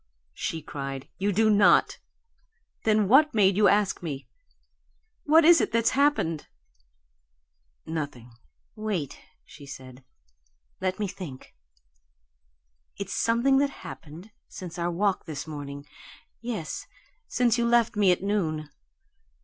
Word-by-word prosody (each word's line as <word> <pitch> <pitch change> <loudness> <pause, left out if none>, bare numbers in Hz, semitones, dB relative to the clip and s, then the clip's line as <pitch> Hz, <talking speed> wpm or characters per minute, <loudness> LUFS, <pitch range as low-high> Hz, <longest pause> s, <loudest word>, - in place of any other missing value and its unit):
"No!" - - -47 0.3
she 160 - -4
cried. 135 -2 -6
"You 200 +2 +1
do 220 +3 +3
not. 200 -4 +4 0.9
Then 215 -2 +3
what 285 +5 +5
made 195 -3 +4
you 210 +1 +5
ask 205 -1 +2
me? 145 -6 -6 1.0
What 315 +2 +5
is 340 0 +7
it - - -1
that's 230 0 +2
happened?" 275 - +1 1.4
"Nothing." 145 -7 -5 0.4
"Wait," 205 -10 -3 0.3
she 145 -2 -14
said. 130 -1 -11 0.8
"Let 185 0 -1
me 210 - -2
think. 175 -9 -9 1.4
It's 200 -1 -5
something 240 +4 +2
that 285 0 +2 0.2
happened 165 +7 -10 0.2
since 175 -2 -8
our 170 0 0
walk 190 +3 0
this 155 -1 -5
morning 145 -2 -7 0.6
yes, 230 -9 -5 0.4
since 240 -1 +1
you 235 - +2
left 235 -1 +3
me 200 -3 +4
at 180 - 0
noon. 160 -7 -1
190 Hz, 125 wpm, -26 LUFS, 155-225 Hz, 1.4 s, is